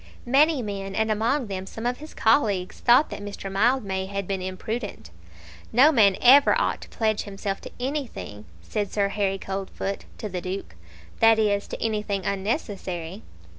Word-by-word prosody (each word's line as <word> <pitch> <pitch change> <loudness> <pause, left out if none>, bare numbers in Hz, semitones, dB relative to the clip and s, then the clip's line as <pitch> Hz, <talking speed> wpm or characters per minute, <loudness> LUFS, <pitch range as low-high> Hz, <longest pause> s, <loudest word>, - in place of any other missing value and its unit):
Many 280 +2 +4
men, 195 -2 -5
and 220 0 +1
among 235 +6 +1
them 190 -2 -5
some 225 +4 -7
of 245 0 -1
his 305 +1 -11
colleagues, 210 -6 +2
thought 250 +5 +5
that - - -6
Mr. 200 -1 -6
Mildmay 195 -3 +1
had 200 -1 -4
been 195 -1 -2
imprudent. 190 - -5 0.6
"No 270 +7 +6
man 205 -9 +5
ought - - -11
ever 275 +3 +7 0.2
to - - -13
pledge 220 -2 0
himself 195 -1 -4
to - - -9
anything," 250 - -4 0.2
said 200 - -3
Sir 200 -1 +1
Harry 195 -1 0
Coldfoot 195 0 -4
to 215 - -5
the 185 -3 -4
Duke; 185 - -5 0.5
"that 225 0 +6
is, 205 -2 +1
to - - -6
anything 210 -3 -2
unnecessary." 195 - -3
205 Hz, 165 wpm, -25 LUFS, 195-230 Hz, 0.6 s, ever